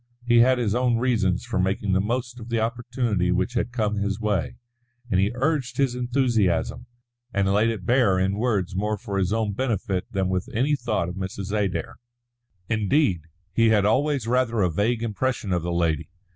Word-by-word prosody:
He 120 Hz, -1 st, +5 dB
had 130 Hz, +2 st, +5 dB
his 115 Hz, -4 st, 0 dB
own 120 Hz, -1 st, +2 dB
reasons 115 Hz, -6 st, +1 dB
for 120 Hz, -5 st, -2 dB
making 95 Hz, +1 st, 0 dB
the 95 Hz, -, +3 dB
most 120 Hz, +3 st, -3 dB
of 115 Hz, 0 st, -9 dB
the 115 Hz, -1 st, 0 dB
opportunity 115 Hz, -5 st, -1 dB
which 95 Hz, +6 st, 0 dB
had 120 Hz, 0 st, -1 dB
come 105 Hz, -3 st, -1 dB
his 100 Hz, 0 st, -1 dB
way; 100 Hz, -, -1 dB, 0.6 s
and 95 Hz, -, +3 dB
he 100 Hz, +2 st, +3 dB
urged 130 Hz, -2 st, -1 dB
his 135 Hz, -3 st, +2 dB
enthusiasm, 120 Hz, -6 st, 0 dB, 0.4 s
and 100 Hz, -3 st, +1 dB
laid 110 Hz, +3 st, +3 dB
it 105 Hz, -5 st, -4 dB
bare 120 Hz, -6 st, +3 dB
in 95 Hz, +1 st, +1 dB
words 100 Hz, -7 st, 0 dB
more 105 Hz, +2 st, -1 dB
for 100 Hz, 0 st, -3 dB
his 95 Hz, 0 st, 0 dB
own 110 Hz, -2 st, 0 dB
benefit 100 Hz, -6 st, -2 dB
than 95 Hz, -1 st, 0 dB
with 95 Hz, -1 st, -2 dB
any 140 Hz, +6 st, +2 dB
thought 95 Hz, -10 st, -1 dB
of 90 Hz, -, -5 dB
Mrs. 95 Hz, +1 st, -5 dB
Adair. 95 Hz, -6 st, -2 dB, 0.7 s
Indeed, 105 Hz, -, +1 dB, 0.3 s
he 115 Hz, +2 st, +4 dB
had 105 Hz, -3 st, +3 dB
always 135 Hz, +3 st, +1 dB
rather 120 Hz, -2 st, +1 dB
a 90 Hz, -, +1 dB
vague 110 Hz, +7 st, 0 dB
impression 115 Hz, -2 st, -1 dB
of 90 Hz, -, +1 dB
the 85 Hz, +2 st, -3 dB
lady. 85 Hz, -3 st, 0 dB
110 Hz, 185 wpm, -24 LUFS, 95-120 Hz, 0.7 s, He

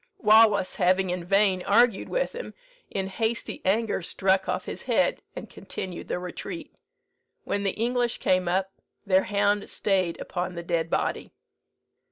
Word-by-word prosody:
Wallace 215 Hz, -3 st, +4 dB
having 185 Hz, 0 st, +2 dB
in 180 Hz, -1 st, -3 dB
vain 195 Hz, 0 st, +3 dB
argued 225 Hz, +2 st, +3 dB
with -, -, -1 dB
him, 485 Hz, +2 st, -7 dB, 0.3 s
in 195 Hz, -1 st, -2 dB
hasty 225 Hz, +4 st, -2 dB
anger 210 Hz, +2 st, +1 dB
struck 190 Hz, +2 st, +1 dB
off -, -, -2 dB
his -, -, -6 dB
head, -, -, +1 dB
and -, -, -7 dB
continued 180 Hz, -2 st, -7 dB
the -, -, -2 dB
retreat. 180 Hz, -, -7 dB, 0.7 s
When 200 Hz, -, -2 dB
the 195 Hz, -2 st, -2 dB
English 240 Hz, +1 st, 0 dB
came 185 Hz, -1 st, +1 dB
up, 190 Hz, +2 st, 0 dB, 0.3 s
their 190 Hz, -1 st, +3 dB
hound 205 Hz, +1 st, +1 dB
stayed 185 Hz, -4 st, 0 dB
upon 180 Hz, 0 st, -4 dB
the 170 Hz, -, -5 dB
dead 170 Hz, -1 st, -1 dB
body. -, -, -1 dB
195 Hz, 150 wpm, -26 LUFS, 185-220 Hz, 0.7 s, Wallace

